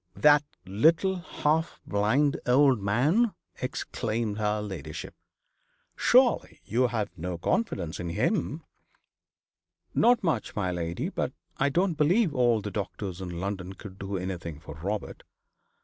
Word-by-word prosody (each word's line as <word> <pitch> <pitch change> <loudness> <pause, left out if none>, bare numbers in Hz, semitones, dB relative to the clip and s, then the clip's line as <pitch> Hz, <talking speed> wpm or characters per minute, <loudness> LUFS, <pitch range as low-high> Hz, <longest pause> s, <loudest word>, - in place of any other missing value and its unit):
'That 150 0 +6 0.2
little 165 - +3
half 160 -2 -1
blind 120 +9 +2
old 130 -2 +5
man!' 150 - +2 0.3
exclaimed 115 -4 -2
her 105 0 +1
ladyship. 95 -8 -6 0.8
'Surely 250 0 +3
you 120 +4 +2
have 110 -6 -3
no 90 +1 -4
confidence 85 - -1
in 85 - -3
him?' 85 - 0 1.3
'Not 240 -1 +4
much, 165 -4 -1
my 95 -3 0
lady. 85 -1 -2
But - - -2 0.2
I 135 - +2
don't 175 +2 +1
believe 175 +3 +3
all 120 -4 +3
the 105 - -5
doctors 95 -2 -4
in 90 -2 -5
London 95 -1 -4
could 95 0 -11
do 100 0 -3
anything 85 -4 -5
for 80 -1 -9
Robert. 100 +7 -4
105 Hz, 130 wpm, -28 LUFS, 95-150 Hz, 1.3 s, That